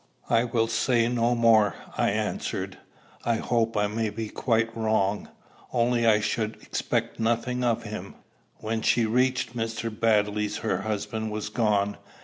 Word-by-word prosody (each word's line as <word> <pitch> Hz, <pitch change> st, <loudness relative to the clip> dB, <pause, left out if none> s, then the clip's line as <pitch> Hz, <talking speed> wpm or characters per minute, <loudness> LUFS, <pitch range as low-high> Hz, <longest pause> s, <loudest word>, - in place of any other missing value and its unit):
"I 115 Hz, 0 st, +4 dB
will 115 Hz, -1 st, +1 dB
say 115 Hz, +1 st, +2 dB
no 120 Hz, 0 st, +1 dB
more," 110 Hz, -4 st, +4 dB, 0.2 s
I -, -, +2 dB
answered. -, -, -3 dB, 0.4 s
"I 115 Hz, -, +1 dB
hope 115 Hz, -1 st, 0 dB
I 105 Hz, -, +3 dB
may 110 Hz, +1 st, -1 dB
be 110 Hz, +1 st, -5 dB
quite 115 Hz, -1 st, 0 dB
wrong. 110 Hz, -3 st, 0 dB, 0.4 s
Only 120 Hz, -1 st, +2 dB
I 105 Hz, -1 st, +5 dB
should 110 Hz, +1 st, -1 dB
expect -, -, -2 dB
nothing 120 Hz, +2 st, 0 dB
of 120 Hz, -2 st, +1 dB
him." -, -, -7 dB, 0.4 s
When 110 Hz, +1 st, -3 dB
she 115 Hz, +1 st, +3 dB
reached 125 Hz, +1 st, +1 dB
Mr. 115 Hz, 0 st, -3 dB
Baddeley's 105 Hz, -1 st, +1 dB
her 95 Hz, -4 st, +1 dB
husband 110 Hz, +1 st, -3 dB
was 110 Hz, 0 st, -4 dB
gone. 105 Hz, -3 st, +1 dB
115 Hz, 145 wpm, -26 LUFS, 105-115 Hz, 0.4 s, I